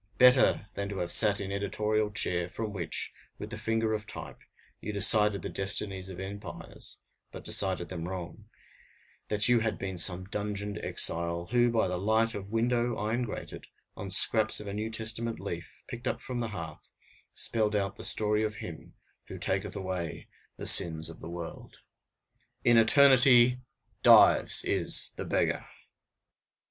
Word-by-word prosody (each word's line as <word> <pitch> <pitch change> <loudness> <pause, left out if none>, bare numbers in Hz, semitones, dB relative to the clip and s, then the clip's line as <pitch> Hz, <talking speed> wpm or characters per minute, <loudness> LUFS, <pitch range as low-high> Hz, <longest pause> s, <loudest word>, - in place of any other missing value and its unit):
Better 125 -4 +5
than 100 0 -4
to 100 - -6
have 85 -2 -3
sat 105 -3 +5
in 100 -1 -5
editorial 105 +2 -1
chair, 90 -4 -1
from 105 +2 -5
which, 90 -5 -4 0.2
with - - -8
the - - -4
finger 115 -1 -1
of 105 0 -4
type, - - -9 0.4
you 105 - -5
decided 105 0 +3
the - - -3
destinies 95 -1 -3
of 95 -1 -9
empires, 100 +2 -8 0.3
but - - -10
decided 95 -3 0
them 85 -2 -5
wrong, 90 -3 -7 0.8
that 105 0 +2
you 120 -1 +4
had 110 -1 -2
been 95 -2 -5
some 90 +2 +2
dungeoned 100 0 -4
exile, 85 +1 0
who, 120 0 +3
by 115 -4 +1
the 90 -1 -3
light 110 +3 +1
of 100 -1 -7
window 120 +1 0
iron 110 +4 -2
grated, 120 -4 -7 0.3
on 100 - -7
scraps 110 +3 +4
of 105 - -8
a 100 - -6
New 105 +2 -3
Testament 110 +1 -3
leaf, - - -8
picked 120 +1 -7
up - - -2
from 125 -2 -5
the 120 - -2
hearth, 85 -7 -8 0.5
spelled 110 -2 +1
out 100 -1 -2
the - - -9
story 105 0 0
of 110 0 -3
Him 85 -5 -10 0.3
who - - -8
taketh - - -3
away 95 -3 -5 0.3
the - - -7
sins 80 -1 +2
of - - -14
the 80 - -9
world. 85 -1 -9 0.9
IN 120 - +4
ETERNITY, 125 0 +6 0.4
DIVES - - +6
IS - - +2
THE - - -6
BEGGAR! - - -1
105 Hz, 160 wpm, -29 LUFS, 95-115 Hz, 0.9 s, ETERNITY